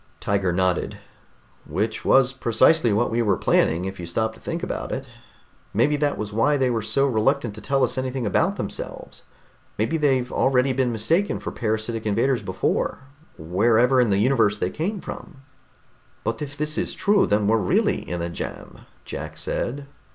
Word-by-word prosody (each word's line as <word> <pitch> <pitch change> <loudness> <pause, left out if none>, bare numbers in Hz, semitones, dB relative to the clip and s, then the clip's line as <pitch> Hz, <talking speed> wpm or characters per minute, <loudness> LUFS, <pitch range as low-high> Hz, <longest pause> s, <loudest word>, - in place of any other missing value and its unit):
Tiger 100 -3 0
nodded. 90 0 0 0.7
"Which 110 +2 -2
was 135 -1 +4
precisely 125 +2 +3
what 110 +4 +1
we 115 +1 +1
were 105 -3 +2
planning, 85 +3 +2
if 95 0 -6
you 85 - -6
stop 110 +6 -1
to - - -16
think - - -4
about - - -4
it. - - -4 0.7
Maybe 135 +7 +3
that 145 0 0
was 105 -1 -5
why 145 +7 +3
they 130 -2 +1
were 115 -2 0
so 110 +6 +1
reluctant 125 -1 +1
to 110 - -9
tell 135 0 +1
us 130 - 0
anything 130 -1 -3
about 100 - +1
themselves. - - -6 0.6
Maybe 115 +10 0
they've 135 -5 +1
already 130 0 +2
been 130 -1 +1
mistaken 160 - 0
for - - -5
parasitic 110 0 -2
invaders 115 +4 +1
before, 95 -2 -1 0.4
wherever 115 +10 +3
in 120 - +2
the 100 - +2
universe 110 -2 +3
they 90 -2 -1
came 190 +5 -3
from." 145 -7 -9 0.8
"But 115 +3 -2
if 145 -1 -6
this 150 +1 -1
is - - -2
true, 205 -1 +3
then 105 0 +2
we're 110 +2 +3
really 95 -5 +1
in 85 0 -3
a 85 - -3
jam," - - -7 0.3
Jack - - -6
said. 140 +3 -3
115 Hz, 175 wpm, -23 LUFS, 105-135 Hz, 0.8 s, was